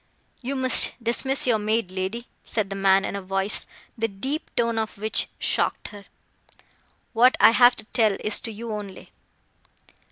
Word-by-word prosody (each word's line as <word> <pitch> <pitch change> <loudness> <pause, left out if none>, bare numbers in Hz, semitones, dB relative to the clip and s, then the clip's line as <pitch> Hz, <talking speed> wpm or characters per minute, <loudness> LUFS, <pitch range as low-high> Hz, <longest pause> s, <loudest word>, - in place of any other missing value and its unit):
"You 265 +2 -4
must 260 -1 +4
dismiss 255 +3 0
your 235 -4 +2
maid, 215 -2 -1
lady," 190 +6 -4 0.2
said 205 -3 -3
the - - -3
man 195 0 +3
in - - -4
a 200 - -4
voice, 195 +2 -2 0.3
the 225 -1 -1
deep 265 +10 -5
tone 230 -1 0
of 220 -2 -4
which 215 +2 0
shocked - - -1
her, 205 -1 -13 1.1
"what 245 +3 +4
I - - +7
have 245 +1 +5
to 220 - -7
tell 220 -2 +2
is 210 - -1
to 225 - -4
you 225 +2 -7
only." 205 -3 -8
220 Hz, 165 wpm, -24 LUFS, 200-235 Hz, 1.1 s, I